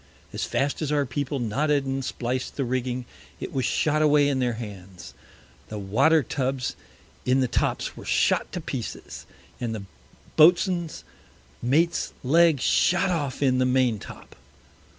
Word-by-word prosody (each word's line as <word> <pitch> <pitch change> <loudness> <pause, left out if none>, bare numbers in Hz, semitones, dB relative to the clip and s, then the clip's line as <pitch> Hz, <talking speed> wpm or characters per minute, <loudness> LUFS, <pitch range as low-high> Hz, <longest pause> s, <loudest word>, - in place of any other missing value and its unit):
As - - -2
fast 140 +3 -1
as 150 -2 -1
our 145 -1 +2
People 140 +3 -3
knotted 140 +5 0
and 135 0 -2
spliced 125 +1 -3
the 140 - -1
Rigging, 125 0 -2 0.3
it - - -6
was 130 -2 0
shot 155 0 +1
away 150 -1 +4
in 135 -2 0
their 125 -2 +1
Hands. 100 -5 -9 0.6
The 110 - -5
Water 115 +11 +3
Tubs 130 0 -2 0.5
in 130 +1 +2
the 130 - +2
Tops 120 - -1
were - - -10
shot - - +1
to - - -3
pieces, - - -6 0.3
and 115 -2 -3
the 105 - -6 0.5
Boatswain's 175 +1 +4 0.6
Mate's 160 +8 +1
Leg 160 +2 +4
shot 185 +8 +2
off 145 -5 -2
in 130 -2 +3
the 130 - +3
Main 125 -4 +2
top. - - -12
135 Hz, 150 wpm, -25 LUFS, 125-150 Hz, 0.6 s, away